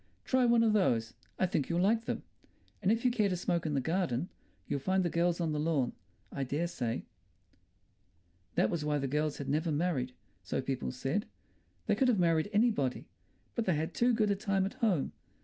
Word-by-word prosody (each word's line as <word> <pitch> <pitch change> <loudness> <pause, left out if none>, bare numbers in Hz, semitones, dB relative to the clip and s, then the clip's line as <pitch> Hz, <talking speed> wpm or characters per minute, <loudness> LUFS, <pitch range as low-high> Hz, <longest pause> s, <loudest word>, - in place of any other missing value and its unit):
"Try 260 -1 +3
one 235 -1 +5
of 220 -2 +3
those; 120 - +2 0.2
I - - +2
think 165 -6 -1
you'll 170 0 +1
like 225 +3 +2
them. - - -3 0.6
And 195 0 +3
if 230 +2 0
you 250 - +5
care 215 -4 +2
to 180 - -1
smoke 170 -2 0
in 150 - -1
the - - +3
garden, 165 0 -1 0.4
you'll 140 - -1
find 185 +7 +1
the 170 - 0
girls 170 +1 +1
on 165 -2 0
the 150 - -1
lawn, 150 -5 +1 0.4
I 140 - -2
dare 145 +6 -1
say." 120 -9 -3 1.5
That 110 - +3
was 165 -3 -1
why 150 0 +1
the 140 -1 -1
girls 150 +2 0
had 140 - -5
never 155 +4 0
married, 145 -5 0 0.3
so 90 - -2
people 130 -1 -2
said. 135 - -2 0.6
They - - +2
could 265 - +2
have 240 -4 +3
married 165 0 +2
anybody. 205 - +1 0.4
But 230 - -1
they 185 - +2
had 160 +3 -2
too 245 +1 +3
good 215 -3 +2
a - - +2
time 195 -1 0
at 195 - -4
home. 190 - +2
170 Hz, 205 wpm, -32 LUFS, 140-205 Hz, 1.5 s, one